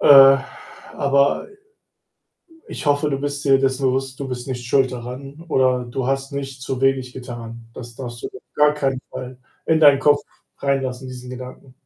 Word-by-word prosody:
Äh, 135 -1 +9 0.6
aber 140 - +2 1.2
ich - - -7
hoffe, 145 +1 +2
du 135 - -1
bist 145 0 -3
dir 135 -1 +5
dessen 135 0 0
bewusst, 130 0 -1
du 135 - -4
bist 125 0 -5
nicht 125 -2 -5
schuld 130 +1 +2
daran 130 +6 -8
oder 130 -4 +2
du 125 +1 -3
hast 135 0 -1
nicht 135 -1 -5
zu 130 -1 -3
wenig 135 -2 +1
getan. 115 -2 -8
Das 120 -1 -9
darfst 120 -1 -7
du - - -2
auf 130 - -13
gar 150 0 +4
keinen 135 -3 -1
Fall 125 0 -7 0.3
in 160 0 +3
deinen 145 -2 +7
Kopf 145 +1 +4 0.4
reinlassen, 130 -2 -1
diesen 125 0 -8
Gedanken. 130 +1 -10
135 Hz, 170 wpm, -21 LUFS, 125-140 Hz, 1.2 s, Äh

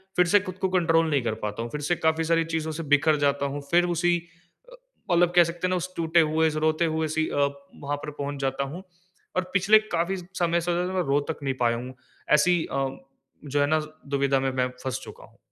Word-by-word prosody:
फ़िर 180 -1 +4
से 205 +4 +5
ख़ुद 185 -2 -7
को 190 - +1
कंट्रोल 165 -3 +2
नहीं 145 -3 +2
कर 115 -2 -1
पाता 105 +1 -3
हूँ। 120 - -5
फ़िर 150 - -4
से 150 +4 0
काफ़ी 160 0 +1
सारी 165 0 +2
चीज़ों 160 -1 -1
से 160 +2 -5
बिखर 150 +2 +4
जाता 140 0 +1
हूँ, 140 +1 -4
फ़िर 175 +1 +4
उसी 175 +1 +2 0.5
अ, - - -13 0.4
मतलब 175 0 +3
कह 175 - +8
सकते 170 +2 -3
हैं 185 - -1
ना 180 - +1 0.2
टूटे 165 0 +2
हुए 160 +1 +3
उस 155 - -2
रोते 155 +2 +1
हुए 160 0 0
सी 160 - +2
अ, - - -4 0.4
वहाँ 145 0 -4
पर 150 - -5
पहुँच 145 -1 -5
जाता 135 0 -1
हूँ। 185 - -8 0.5
और 185 - +1
पिछले 200 +3 +5
काफ़ी 175 +3 0
समय 175 -2 -1
से 175 +1 -1 0.2
मैं 185 - +1
रो 140 +1 +3
तक 160 - -3
नहीं 135 -1 0
पाया 120 -1 +2
हूँ। 125 +2 -7 0.4
ऐसी 175 +2 +3
अ, 135 0 0 0.6
जो 145 0 -1
है - - +4
ना 155 +1 +2 0.3
दुविधा 140 -1 +1
में 135 0 0
मैं 125 -1 +1 0.2
फँस 130 0 -2
चुका - - -11
हूँ। - - -24
160 Hz, 230 wpm, -26 LUFS, 140-175 Hz, 0.6 s, कह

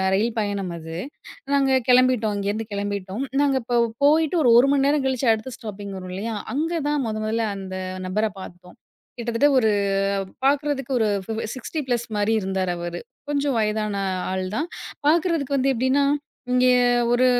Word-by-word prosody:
ரயில் 220 +4 +1
பயணம் 200 -3 -2
அது. 160 0 -8 0.6
நாங்க 270 -2 +3
கெளம்பிட்டோம், 250 -4 +4
இங்கேருந்து 210 +2 -2
கெளம்பிட்டோம். 200 +3 -3 0.2
நாங்க 275 -2 +2
இப்ப 240 0 +2 0.2
போயிட்டு 315 +3 +3
ஒரு 245 - +5
1 270 +3 +4
மணி 275 -1 +2
நேரம் 285 -1 +2
கழிச்சு 260 -1 0
அடுத்த 220 +3 -5
ஸ்டாப்பிங் 205 -3 -7
வரும் 185 0 -8
இல்லையா? 220 +3 -3 0.2
அங்க 320 +4 -1 0.2
தான் 295 -2 0
மொத 215 -1 -3
மொதல்ல 225 +1 0
அந்த 190 -1 -6 0.3
நபர 210 +4 0 0.2
பாத்தோம். 180 0 -12 0.4
கிட்டத்தட்ட 235 +3 +2
ஒரு 220 -3 +3 0.8
பாக்குறதுக்கு 280 -2 0
ஒரு 220 - +3 0.2
ஃபி - - -3 0.2
60 305 +5 -4
ப்ளஸ் 240 -1 0
மாரி 205 +1 +1
இருந்தாரு 190 -1 -1
அவரு. 175 0 -4 0.3
கொஞ்சம் 285 -1 0
வயதான 215 -1 -1 0.4
ஆள் 190 0 -2
தான். 315 - -1 0.4
பாக்குறதுக்கு 315 -4 +2
வந்து 270 +1 +2
எப்டின்னா, 260 +4 +2 0.5
இங்கே 250 0 +4 0.4
ஒரு 255 +1 +4
235 Hz, 155 wpm, -23 LUFS, 205-275 Hz, 0.8 s, ஒரு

